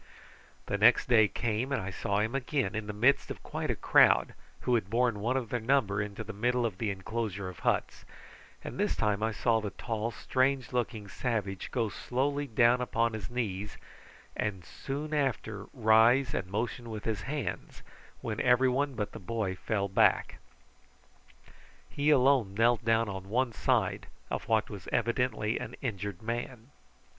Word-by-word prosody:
The -, -, -2 dB
next -, -, +5 dB
day 110 Hz, -3 st, +6 dB
came 115 Hz, +5 st, -2 dB
and 140 Hz, -, +1 dB
I 95 Hz, +1 st, -5 dB
saw 100 Hz, +2 st, -1 dB
him 110 Hz, +3 st, -1 dB
again 130 Hz, -5 st, -1 dB
in 110 Hz, 0 st, -4 dB
the -, -, -2 dB
midst 125 Hz, +7 st, +2 dB
of -, -, -7 dB
quite -, -, -4 dB
a -, -, +1 dB
crowd, -, -, +4 dB, 0.3 s
who 125 Hz, -, 0 dB
had 110 Hz, -5 st, +1 dB
borne 115 Hz, -1 st, +1 dB
one 120 Hz, +5 st, 0 dB
of 120 Hz, -4 st, -3 dB
their 120 Hz, -, -1 dB
number 110 Hz, -5 st, +1 dB
into 105 Hz, +2 st, -5 dB
the 110 Hz, +1 st, -7 dB
middle 120 Hz, +4 st, +1 dB
of 100 Hz, -5 st, -3 dB
the 110 Hz, -, 0 dB
inclosure 100 Hz, 0 st, -3 dB
of 90 Hz, -, -11 dB
huts, -, -, -1 dB, 0.6 s
and -, -, -7 dB
this -, -, +1 dB
time 105 Hz, -1 st, 0 dB
I 110 Hz, +1 st, +1 dB
saw 115 Hz, 0 st, +1 dB
the 105 Hz, -, -3 dB
tall 110 Hz, +2 st, -3 dB
strange 130 Hz, +1 st, 0 dB
looking 115 Hz, -4 st, -2 dB
savage 100 Hz, -4 st, -3 dB
go 115 Hz, -3 st, 0 dB
slowly 140 Hz, +6 st, -2 dB
down 120 Hz, +1 st, +4 dB
upon 115 Hz, -2 st, 0 dB
his 110 Hz, -2 st, -5 dB
knees, 105 Hz, -5 st, -3 dB, 0.6 s
and 95 Hz, -4 st, -3 dB
soon 145 Hz, +3 st, -5 dB
after 120 Hz, -8 st, -1 dB
rise 115 Hz, +2 st, +4 dB
and 95 Hz, -, -2 dB
motion 115 Hz, +3 st, -3 dB
with 110 Hz, -2 st, -6 dB
his 110 Hz, -3 st, -1 dB
hands, 145 Hz, +4 st, -5 dB, 0.4 s
when -, -, -3 dB
everyone 130 Hz, +2 st, +3 dB
but 105 Hz, -3 st, -3 dB
the -, -, -9 dB
boy 100 Hz, 0 st, -2 dB
fell 100 Hz, +1 st, -1 dB
back. 95 Hz, -, +2 dB, 1.5 s
He 145 Hz, +1 st, +1 dB
alone 130 Hz, -8 st, +4 dB
knelt 115 Hz, +2 st, +3 dB
down 115 Hz, 0 st, +2 dB
on 95 Hz, -1 st, -6 dB
one 120 Hz, +2 st, +1 dB
side -, -, 0 dB, 0.2 s
of -, -, -3 dB
what 110 Hz, -1 st, +2 dB
was 100 Hz, -5 st, -9 dB
evidently 120 Hz, -1 st, 0 dB
an -, -, -6 dB
injured 105 Hz, -6 st, -4 dB
man. 120 Hz, +2 st, -5 dB
115 Hz, 170 wpm, -30 LUFS, 105-125 Hz, 1.5 s, day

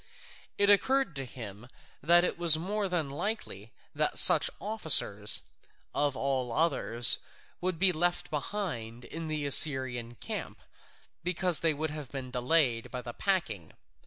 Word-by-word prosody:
It 200 Hz, 0 st, +4 dB
occurred 260 Hz, -, +1 dB
to 135 Hz, -, -4 dB
him 115 Hz, -2 st, -10 dB, 0.3 s
it 175 Hz, +4 st, +2 dB
was 165 Hz, -3 st, +5 dB
more 200 Hz, +4 st, -4 dB
than 170 Hz, -5 st, -2 dB
likely 140 Hz, -, -6 dB, 0.2 s
that -, -, -1 dB
such -, -, +6 dB
officers, 155 Hz, -, +3 dB, 0.5 s
of 145 Hz, -2 st, -1 dB
all 130 Hz, -3 st, -3 dB
others, 120 Hz, -5 st, +3 dB, 0.4 s
would 180 Hz, -1 st, -3 dB
be 190 Hz, +2 st, +3 dB
left 175 Hz, +1 st, -2 dB
behind 135 Hz, -, -6 dB
in 165 Hz, 0 st, -8 dB
the 155 Hz, -2 st, -4 dB
Assyrian 130 Hz, -5 st, +5 dB
camp, -, -, -7 dB, 0.6 s
because 180 Hz, -1 st, -1 dB
they 160 Hz, -2 st, 0 dB
would 155 Hz, +1 st, -4 dB
have 150 Hz, -4 st, -8 dB
been 130 Hz, -2 st, -8 dB
delayed 125 Hz, -2 st, 0 dB
by 125 Hz, -1 st, -7 dB
the 120 Hz, -, -8 dB
packing. 175 Hz, -, -3 dB
150 Hz, 135 wpm, -28 LUFS, 125-175 Hz, 0.6 s, such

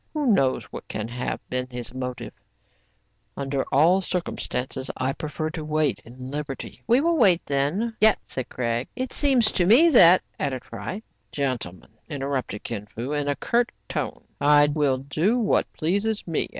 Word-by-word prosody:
Who 300 Hz, -1 st, 0 dB
knows 165 Hz, -, +3 dB
what -, -, -9 dB
can 105 Hz, 0 st, -4 dB
have 125 Hz, +1 st, -4 dB
been 125 Hz, 0 st, -2 dB
his 120 Hz, -2 st, -6 dB
motive? 125 Hz, -1 st, -5 dB, 1.0 s
Under 135 Hz, -1 st, -1 dB
all 170 Hz, +7 st, +5 dB
circumstances, 130 Hz, -8 st, -3 dB
I 130 Hz, +1 st, 0 dB
prefer 155 Hz, +2 st, -4 dB
to 160 Hz, -2 st, -5 dB
wait 155 Hz, -3 st, 0 dB
in 125 Hz, +2 st, -10 dB
liberty. 145 Hz, -2 st, -6 dB
" -, -, -44 dB
We 240 Hz, +3 st, +4 dB
will 335 Hz, +1 st, +2 dB
wait 185 Hz, -7 st, +4 dB
then. 160 Hz, +12 st, 0 dB
Yet 220 Hz, 0 st, +6 dB
" -, -, -45 dB
— -, -, -41 dB
said 130 Hz, -, -5 dB
Craig. 120 Hz, 0 st, -2 dB
" -, -, -44 dB
It 255 Hz, 0 st, -4 dB
seems 260 Hz, -6 st, +3 dB
to 175 Hz, -2 st, +1 dB
me 275 Hz, -, +7 dB
that 185 Hz, -, +7 dB
'* -, -, -44 dB
— -, -, -41 dB
added 130 Hz, -3 st, -2 dB
Fry. 115 Hz, -, -6 dB, 0.3 s
"Gentlemen," 120 Hz, -, -3 dB, 0.2 s
interrupted 135 Hz, -7 st, -3 dB
Kin 105 Hz, -3 st, -5 dB
Fo, 120 Hz, +6 st, -6 dB
in 145 Hz, -1 st, -1 dB
a 145 Hz, -, +1 dB
curt 235 Hz, -, +1 dB, 0.2 s
tone, -, -, -4 dB, 0.2 s
'* -, -, -36 dB, 0.2 s
I 145 Hz, 0 st, +6 dB
will 145 Hz, -4 st, +2 dB
do 155 Hz, -, 0 dB
what 225 Hz, -4 st, +1 dB
pleases 205 Hz, +6 st, -1 dB
me. 165 Hz, -3 st, -1 dB
145 Hz, 190 wpm, -25 LUFS, 130-195 Hz, 1.0 s, me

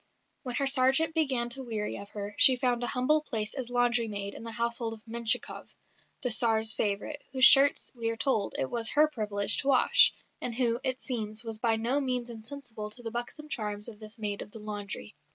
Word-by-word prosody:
When 250 Hz, -3 st, -5 dB
her 275 Hz, -, 0 dB
sergeant 270 Hz, +4 st, +4 dB
began 265 Hz, -7 st, +1 dB
to 265 Hz, +3 st, -3 dB
weary 220 Hz, -4 st, -4 dB
of 200 Hz, 0 st, -10 dB
her, 205 Hz, 0 st, -6 dB
she 260 Hz, -, +7 dB
found 245 Hz, -1 st, 0 dB
a -, -, 0 dB
humble 300 Hz, +5 st, +3 dB
place 225 Hz, -7 st, -3 dB
as 255 Hz, -3 st, -5 dB
laundry 245 Hz, -1 st, +1 dB
maid 200 Hz, -1 st, -5 dB
in -, -, -9 dB
the 230 Hz, -, -6 dB
household 235 Hz, 0 st, -1 dB
of 220 Hz, -, -20 dB
Menshikoff, 230 Hz, 0 st, -1 dB, 0.5 s
the 250 Hz, -, +2 dB
Tsar's 220 Hz, -1 st, +3 dB
favourite, 210 Hz, +8 st, -2 dB
whose 260 Hz, 0 st, +6 dB
shirts, 275 Hz, +1 st, +6 dB
we 230 Hz, -2 st, -3 dB
are 230 Hz, -, -3 dB
told, 225 Hz, -4 st, -1 dB
it 130 Hz, -, -2 dB
was 230 Hz, -1 st, 0 dB
her 300 Hz, +1 st, +5 dB
privilege 210 Hz, -7 st, 0 dB
to -, -, -3 dB
wash; 265 Hz, -3 st, +5 dB, 0.3 s
and 235 Hz, -, -4 dB
who, 240 Hz, -1 st, +1 dB
it 260 Hz, 0 st, -2 dB
seems, 220 Hz, -3 st, -2 dB
was 225 Hz, -2 st, -6 dB
by 225 Hz, -1 st, +2 dB
no 235 Hz, +5 st, 0 dB
means 250 Hz, -3 st, -2 dB
insensible 225 Hz, -1 st, -7 dB
to 240 Hz, +3 st, -5 dB
the 225 Hz, -, -5 dB
buxom 240 Hz, +6 st, -5 dB
charms 210 Hz, -6 st, -3 dB
of 210 Hz, -2 st, -13 dB
this 215 Hz, +1 st, -8 dB
maid 205 Hz, -2 st, -3 dB
of -, -, -8 dB
the 215 Hz, -, -11 dB
laundry. 205 Hz, -, -6 dB
235 Hz, 210 wpm, -29 LUFS, 215-255 Hz, 0.5 s, she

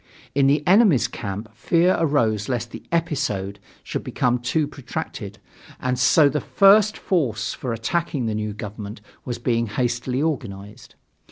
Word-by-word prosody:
In 140 Hz, -1 st, +3 dB
the 145 Hz, +2 st, +2 dB
enemy's 185 Hz, -, +5 dB
camp 105 Hz, -2 st, -6 dB
fear 175 Hz, +2 st, +2 dB
arose 115 Hz, -9 st, +1 dB
lest 120 Hz, -2 st, -2 dB
the -, -, -8 dB
"episode" 140 Hz, -, -1 dB, 0.2 s
should -, -, -4 dB
become 125 Hz, 0 st, 0 dB
too 145 Hz, +5 st, 0 dB
protracted, 140 Hz, -3 st, -6 dB, 0.4 s
and 130 Hz, -1 st, -1 dB
so 145 Hz, +4 st, +5 dB
the 150 Hz, +1 st, -1 dB
first 205 Hz, +1 st, +5 dB
force 130 Hz, -, -1 dB
for 125 Hz, -, -5 dB
attacking 130 Hz, +4 st, -1 dB
the 110 Hz, -, -1 dB
new 105 Hz, 0 st, -2 dB
government 105 Hz, 0 st, -7 dB, 0.3 s
was 120 Hz, -2 st, -3 dB
being 115 Hz, -1 st, 0 dB
hastily 120 Hz, +3 st, -1 dB
organized. 115 Hz, -7 st, -4 dB
125 Hz, 145 wpm, -23 LUFS, 110-150 Hz, 0.4 s, enemy's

